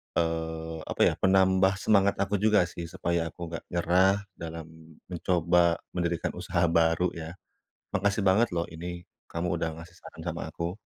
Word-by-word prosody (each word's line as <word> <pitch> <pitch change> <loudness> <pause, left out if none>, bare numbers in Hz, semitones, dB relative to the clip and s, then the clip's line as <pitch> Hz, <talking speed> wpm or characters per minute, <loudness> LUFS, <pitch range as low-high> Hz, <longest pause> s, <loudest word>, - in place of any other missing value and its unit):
eee, 80 -1 -2
apa - - -2
ya, - - +2
penambah 95 0 +4
semangat 100 -1 +4
aku 100 +1 -1
juga 105 0 +4
sih 85 - -6
supaya 85 +1 -1
aku 80 - -12
nggak 85 - -5
nyerah 90 +2 +3 0.3
dalam 80 -1 -6 0.5
mencoba 85 -1 +2 0.2
mendirikan 85 -2 -1
usaha 85 - 0
baru 85 +2 +3
ya. 85 +1 -7 0.6
Makasih 100 +1 +1
banget 105 +6 +4
loh 85 0 0
ini 85 +1 -7 0.3
kamu 85 +1 -2
udah 80 -1 -1
ngasih 85 +1 -12
saran 85 -2 -12
sama 85 0 -3
aku. 85 +5 -4
85 Hz, 155 wpm, -28 LUFS, 85-95 Hz, 0.6 s, penambah